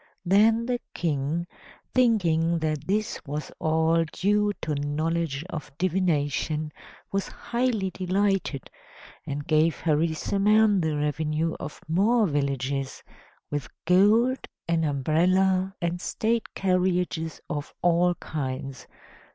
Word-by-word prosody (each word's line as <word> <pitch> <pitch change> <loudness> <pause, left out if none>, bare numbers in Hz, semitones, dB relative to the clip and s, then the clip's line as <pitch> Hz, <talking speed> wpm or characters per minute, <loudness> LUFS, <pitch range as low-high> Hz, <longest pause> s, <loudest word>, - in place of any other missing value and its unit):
Then 220 +5 +4
the 245 0 -1 0.2
King, 155 +1 -1 0.5
thinking 170 -9 +3
that 155 -2 -2
this 210 +2 -1
was 150 -1 -5
all 160 +1 +2
due 205 +2 +2
to 155 - -1
knowledge 150 +1 -1
of 150 -3 -6
divination, 155 -4 0 0.4
was 195 -1 -1
highly 235 -6 -1
delighted, 190 - -1 0.6
and 145 +1 -4
gave 155 +1 +2
Harisarman 195 +6 +2
the 155 -2 0
revenue 150 +2 -1
of 150 - -7
more 210 +8 +3
villages, 140 -3 -2 0.5
with 145 -5 -2 0.2
gold, 215 +9 +4 0.3
an 165 -1 +1
umbrella, 185 +7 +2
and 170 +1 -2
state 230 +4 -1
carriages 180 -3 0
of 145 -1 -4
all 175 0 +3
kinds. 135 -4 -5
170 Hz, 105 wpm, -26 LUFS, 150-195 Hz, 0.6 s, Then